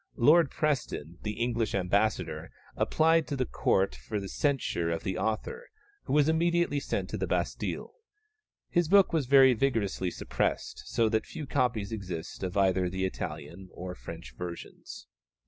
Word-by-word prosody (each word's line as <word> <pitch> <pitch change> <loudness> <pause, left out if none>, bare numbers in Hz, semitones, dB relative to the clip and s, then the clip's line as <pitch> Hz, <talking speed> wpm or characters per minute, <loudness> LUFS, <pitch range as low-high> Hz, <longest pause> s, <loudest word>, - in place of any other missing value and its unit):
Lord 150 +5 +6
Preston, 105 - -2
the 105 - -3
English 115 -3 0
ambassador, 100 +3 0 0.3
applied 160 0 +3
to 145 - -2
the 130 -1 0
Court 95 -3 +1
for 105 - -5
the 100 - -6
censure 125 - 0
of 85 -1 -2
the 95 - -2
author, 110 - -3 0.4
who - - -2
was 150 0 +4
immediately 170 -2 +2
sent - - -2
to - - -2
the - - -1
Bastille. - - -2 0.8
His 175 -2 +2
book 195 +1 +5
was 150 -6 +1
very 135 -1 +7
vigorously 110 -7 0
suppressed, - - -2
so 115 - +2
that 110 0 0
few 150 - -6
copies 115 -6 0
exist 90 -6 -6
of 95 0 -3
either 95 -2 +3
the 95 +1 -2
Italian 85 +1 -6
or 90 0 -6
French - - -9
versions. 85 -3 -8
110 Hz, 155 wpm, -29 LUFS, 95-145 Hz, 0.8 s, very